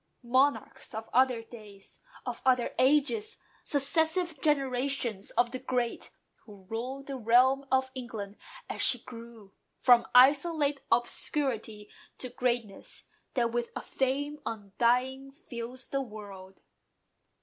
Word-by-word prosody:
Monarchs 255 Hz, -3 st, 0 dB
of 220 Hz, 0 st, -5 dB
other 250 Hz, -2 st, +3 dB
days, 210 Hz, -4 st, -13 dB, 0.3 s
of -, -, -5 dB
other 250 Hz, -2 st, +2 dB
ages, 300 Hz, -, +2 dB, 0.3 s
Successive 320 Hz, +3 st, 0 dB
generations 265 Hz, -7 st, 0 dB
of 240 Hz, 0 st, +3 dB
the 255 Hz, -, -4 dB
great, 245 Hz, -2 st, -2 dB, 0.4 s
Who 205 Hz, -3 st, -14 dB
ruled 250 Hz, +7 st, -5 dB
the 275 Hz, -1 st, -5 dB
realm 255 Hz, +4 st, +4 dB
of 260 Hz, 0 st, +2 dB
England 220 Hz, -5 st, -6 dB, 0.3 s
as -, -, -4 dB
she 255 Hz, -, +5 dB
grew 230 Hz, -4 st, -12 dB, 0.2 s
From 245 Hz, -2 st, +5 dB
isolate 285 Hz, +2 st, +5 dB
obscurity 230 Hz, -3 st, 0 dB, 0.3 s
to 255 Hz, -, -4 dB
greatness 240 Hz, -4 st, -3 dB, 0.3 s
That 235 Hz, -3 st, +1 dB
with 240 Hz, 0 st, -2 dB
a -, -, -3 dB
fame 285 Hz, +3 st, -2 dB
undying 245 Hz, +5 st, 0 dB
fills 255 Hz, -4 st, -7 dB
the 275 Hz, -, -1 dB
world. 200 Hz, -5 st, -10 dB
250 Hz, 115 wpm, -29 LUFS, 230-275 Hz, 0.4 s, she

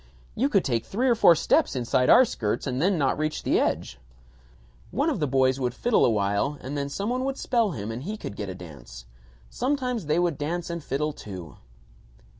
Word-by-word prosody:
You 270 Hz, +5 st, +1 dB
could 195 Hz, -8 st, +2 dB
take 115 Hz, -4 st, 0 dB
three 245 Hz, +7 st, -1 dB
or 245 Hz, -, +5 dB
four 195 Hz, -7 st, +6 dB
steps 145 Hz, -, +2 dB
inside 125 Hz, 0 st, +1 dB
our 260 Hz, -, +8 dB
skirts 105 Hz, -, -2 dB
and 130 Hz, 0 st, -2 dB
then 185 Hz, +2 st, +2 dB
not 140 Hz, -1 st, +1 dB
reach 155 Hz, 0 st, -2 dB
the -, -, +2 dB
edge. 65 Hz, -, -1 dB, 0.9 s
One 290 Hz, +5 st, 0 dB
of 265 Hz, -, -2 dB
the 150 Hz, -, 0 dB
boys 130 Hz, 0 st, +2 dB
would 125 Hz, -2 st, -2 dB
fiddle 240 Hz, -, +2 dB
a -, -, +4 dB
while 105 Hz, +6 st, 0 dB
and 135 Hz, +3 st, -6 dB
then 140 Hz, -1 st, -2 dB
some 200 Hz, +10 st, -3 dB
one 255 Hz, +1 st, -1 dB
would 270 Hz, 0 st, -2 dB
spell 230 Hz, -6 st, +1 dB
him 105 Hz, -2 st, -5 dB
and 115 Hz, +2 st, -5 dB
he 210 Hz, +9 st, -5 dB
could 100 Hz, -, -7 dB
get 100 Hz, -2 st, -5 dB
a 95 Hz, -, -6 dB
dance. 70 Hz, -9 st, -11 dB, 0.5 s
Sometimes 250 Hz, -, -1 dB
they 155 Hz, +2 st, +2 dB
would 175 Hz, -4 st, 0 dB
dance 170 Hz, +4 st, -3 dB
and 170 Hz, -2 st, -5 dB
fiddle 150 Hz, +2 st, -2 dB
too." 90 Hz, -, -9 dB
145 Hz, 215 wpm, -26 LUFS, -, 0.9 s, our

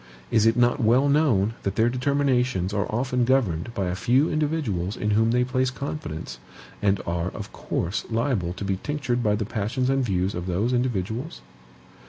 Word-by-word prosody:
Is 110 Hz, 0 st, +4 dB
it 115 Hz, +2 st, +3 dB
not 120 Hz, +2 st, +3 dB
well 125 Hz, +6 st, +4 dB
known 130 Hz, -9 st, +3 dB
that 100 Hz, 0 st, -2 dB
their 110 Hz, +2 st, +3 dB
determinations 125 Hz, -6 st, +1 dB
are 100 Hz, -1 st, -1 dB
often 125 Hz, +2 st, 0 dB
governed 120 Hz, -7 st, +1 dB
by 100 Hz, -, -1 dB
a 90 Hz, -, -1 dB
few 125 Hz, -, +2 dB
individuals 145 Hz, -, -1 dB
in 105 Hz, -, -1 dB
whom 110 Hz, +2 st, +3 dB
they 125 Hz, +1 st, +3 dB
place 130 Hz, +1 st, 0 dB
confidence, 85 Hz, -, -6 dB, 0.4 s
and 100 Hz, -1 st, +2 dB
are, 85 Hz, +1 st, -1 dB
of -, -, -8 dB
course, 90 Hz, +5 st, -3 dB
liable 115 Hz, -7 st, 0 dB
to 100 Hz, -, -6 dB
be 95 Hz, -1 st, 0 dB
tinctured 140 Hz, -5 st, -1 dB
by 105 Hz, -3 st, +2 dB
the 105 Hz, 0 st, -2 dB
passions 115 Hz, +6 st, -1 dB
and 135 Hz, -1 st, +1 dB
views 95 Hz, -3 st, 0 dB
of 90 Hz, +1 st, -4 dB
those 100 Hz, +8 st, 0 dB
individuals? 120 Hz, -, -2 dB
115 Hz, 180 wpm, -25 LUFS, 95-130 Hz, 0.4 s, Is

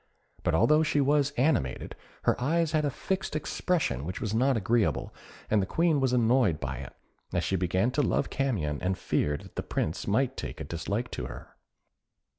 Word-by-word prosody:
But 85 Hz, -, +1 dB
although 150 Hz, -, +5 dB
she 155 Hz, -2 st, +1 dB
was 145 Hz, 0 st, +3 dB
animated, 120 Hz, -, +1 dB, 0.3 s
her -, -, +3 dB
eyes 160 Hz, +4 st, +1 dB
had 155 Hz, -1 st, +2 dB
a -, -, +2 dB
fixed 190 Hz, +4 st, -3 dB
expression 155 Hz, -, -1 dB
which 90 Hz, +5 st, -4 dB
was 105 Hz, -1 st, -2 dB
not 130 Hz, +3 st, +3 dB
agreeable, 100 Hz, -, +1 dB, 0.3 s
and 105 Hz, -1 st, +3 dB
the 95 Hz, -, -2 dB
Queen 165 Hz, -, +2 dB
was 130 Hz, -2 st, +2 dB
annoyed 120 Hz, -8 st, +3 dB
by 65 Hz, -1 st, -4 dB
it, 65 Hz, 0 st, -9 dB, 0.4 s
as -, -, +1 dB
she 95 Hz, -, 0 dB
began 95 Hz, +6 st, +1 dB
to 145 Hz, -, +1 dB
love 140 Hz, -, 0 dB
Camion, 95 Hz, -, -1 dB
and 95 Hz, 0 st, 0 dB
feared 75 Hz, 0 st, 0 dB
that -, -, -15 dB
the -, -, 0 dB
Prince 80 Hz, -, -2 dB
might 130 Hz, +6 st, +1 dB
take -, -, -6 dB
a -, -, -4 dB
dislike 95 Hz, -, -3 dB
to -, -, -4 dB
her. -, -, -10 dB
120 Hz, 190 wpm, -28 LUFS, 85-145 Hz, 0.4 s, although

